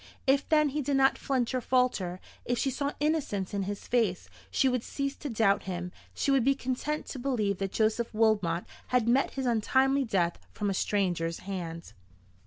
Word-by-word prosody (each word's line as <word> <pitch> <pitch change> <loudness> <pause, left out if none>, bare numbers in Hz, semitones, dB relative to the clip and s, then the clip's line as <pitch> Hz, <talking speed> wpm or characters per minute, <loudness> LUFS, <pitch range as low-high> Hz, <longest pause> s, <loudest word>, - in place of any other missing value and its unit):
If 275 +1 +2
then 305 -2 +4
he 295 +2 -2
did 280 0 0
not 270 0 +4
flinch 255 -3 0
or 255 - 0
falter, 235 -8 +1 0.2
if 245 - -1
she 270 +3 0
saw 280 +2 -2
innocence 290 - -1
in 200 - 0
his 200 +1 -5
face, 225 -7 0 0.2
she 270 - +2
would 250 -2 +1
cease 275 0 -3
to 290 - -5
doubt 210 -3 +2
him, 180 -1 -4 0.2
she 280 - +1
would 270 -3 +4
be 275 +2 +3
content 275 +4 -2
to 265 - -5
believe 220 -7 0
that 195 -1 -2
Joseph 225 +2 +1
Wilmot 210 -6 +2 0.2
had 250 -3 +2
met 255 +3 +2
his 265 -1 -2
untimely 265 +4 +2
death 180 -7 0
from 205 -1 -1
a - - 0
stranger's 175 -4 0
hand. 170 -4 -6
235 Hz, 190 wpm, -29 LUFS, 195-270 Hz, 0.2 s, then